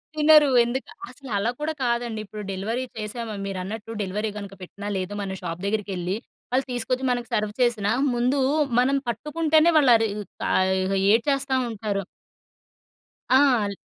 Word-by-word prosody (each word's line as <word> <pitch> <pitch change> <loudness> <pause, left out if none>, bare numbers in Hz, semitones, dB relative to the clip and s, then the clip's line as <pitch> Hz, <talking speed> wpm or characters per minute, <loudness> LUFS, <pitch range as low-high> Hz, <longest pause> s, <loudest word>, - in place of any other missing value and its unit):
తినరు 305 -1 +6 0.2
ఎందుక్ 260 - -3 0.2
అసలలా 230 -5 -3
కూడా 310 +1 -2
కాదండి 235 -2 -1
ఇప్పుడు 210 +1 -8
డెలివరీ 220 +7 -2
చేసామా 220 +1 -4
మీరన్నట్టు. 200 +4 -5
డెలివరీ 210 +3 -2
గనుక 200 -1 -7
పెట్టినా 200 +3 -8
లేదు 185 +2 -4
మన 190 -1 -4
షాప్ 170 0 -5
దగ్గరికెళ్లి 195 -3 -2 0.4
వాళ్ళు 260 +1 +1
తీసుకొచ్చి, 250 +2 -2
మనకి 245 -1 -1
సర్వ్ 210 0 0
చేసినా 220 -4 +2 0.2
ముందు 250 +4 +1 0.4
మనం 270 +2 +3
పట్టుకుంటేనే 310 +7 +2
వాళ్ళు 270 -5 +5
అరి 225 0 +2 0.4
ఆహ్, 190 0 +3
ఇహ! 190 - -2 0.2
ఏడ్చేస్తా 275 +3 +2
ఉంటారు. 205 -2 -3 1.3
ఆ! 260 - +7 0.3
ల్ 200 - -8
225 Hz, 140 wpm, -24 LUFS, 200-260 Hz, 1.3 s, ఆ